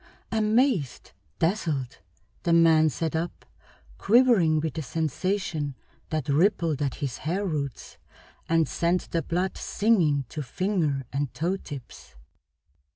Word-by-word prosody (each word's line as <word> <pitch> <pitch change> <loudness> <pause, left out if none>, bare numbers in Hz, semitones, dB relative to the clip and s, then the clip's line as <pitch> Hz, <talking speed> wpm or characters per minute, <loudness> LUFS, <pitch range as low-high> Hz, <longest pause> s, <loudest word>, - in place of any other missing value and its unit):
Amazed, 220 - +1 0.3
dazzled, 160 - -1 0.4
the 170 - +1
man 160 -2 +5
sat 160 +3 -3
up, 165 +2 -4 0.5
quivering 205 -9 +4
with 155 -1 -3
a - - -2
sensation 160 +1 -2 0.3
that 155 -1 -2
rippled 160 -1 +2
at 140 -3 -1
his 135 -4 -4
hair 185 +6 -2
roots 145 -7 -4 0.5
and 165 -1 +3
sent 170 +2 -1
the 165 - +1
blood 180 +5 -1
singing 170 - +2
to 155 - -5
finger 155 -2 -1
and 140 -2 -1
toe 175 +4 0
tips. 140 - -10
165 Hz, 120 wpm, -26 LUFS, 145-190 Hz, 0.5 s, man